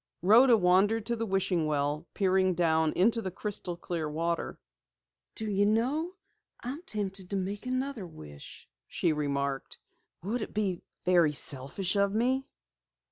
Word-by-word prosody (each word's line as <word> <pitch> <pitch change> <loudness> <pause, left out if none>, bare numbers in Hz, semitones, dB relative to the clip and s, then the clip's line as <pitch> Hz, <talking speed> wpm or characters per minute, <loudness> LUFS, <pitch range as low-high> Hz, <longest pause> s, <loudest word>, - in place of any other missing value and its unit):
Rhoda 230 +5 +7
wandered 205 +4 +3
to 235 - 0
the 230 0 -3
wishing 185 -4 0
well, 150 +2 -1
peering 185 -1 +2
down 160 -2 +2
into 225 +5 +2
the 190 - -3
crystal 185 -2 -3
clear 170 -4 -3
water. 165 +2 -2 0.8
"Do 220 - -4
you 205 0 +2
know, 270 - 0 0.5
I'm 265 +6 -5
tempted 195 - -5
to 200 - -2
make 200 +5 -3
another 255 -5 -2
wish," 75 - -12 0.2
she 170 -3 0
remarked. 140 -2 -2 0.5
"Would 220 +6 -2
it - - -6
be 195 -4 -1 0.2
very 175 -4 +4
selfish 145 +8 +1
of 200 0 +2
me?" 260 +4 +1
190 Hz, 140 wpm, -29 LUFS, 165-220 Hz, 0.8 s, Rhoda